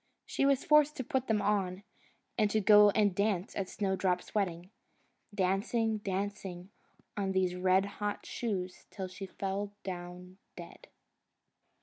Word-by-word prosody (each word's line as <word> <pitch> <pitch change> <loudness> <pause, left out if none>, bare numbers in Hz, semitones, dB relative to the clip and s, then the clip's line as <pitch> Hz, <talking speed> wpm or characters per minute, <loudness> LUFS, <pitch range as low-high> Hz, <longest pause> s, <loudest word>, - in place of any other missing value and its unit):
She 275 - +1
was 275 -1 +2
forced 300 0 +5
to 260 - -2
put 265 -1 -1
them 210 -2 +1
on, 195 -2 0 0.5
and 215 -3 +2
to 215 - +2
go 210 0 +7
and 205 -1 +2
dance 200 -1 -1
at 190 -2 -3
Snowdrop's 190 -3 -1
wedding 180 -3 -2 0.6
dancing, 210 +3 0
dancing 195 -2 -4 0.4
on 195 -2 -1
these 185 -1 +1
red 185 +1 +3 0.2
hot 205 0 -2
shoes 185 -6 -4
till 190 -2 -5
she 190 +1 -8
fell 200 +2 -4
down 180 0 -7 0.2
dead. - - -11
195 Hz, 135 wpm, -32 LUFS, 185-210 Hz, 0.6 s, go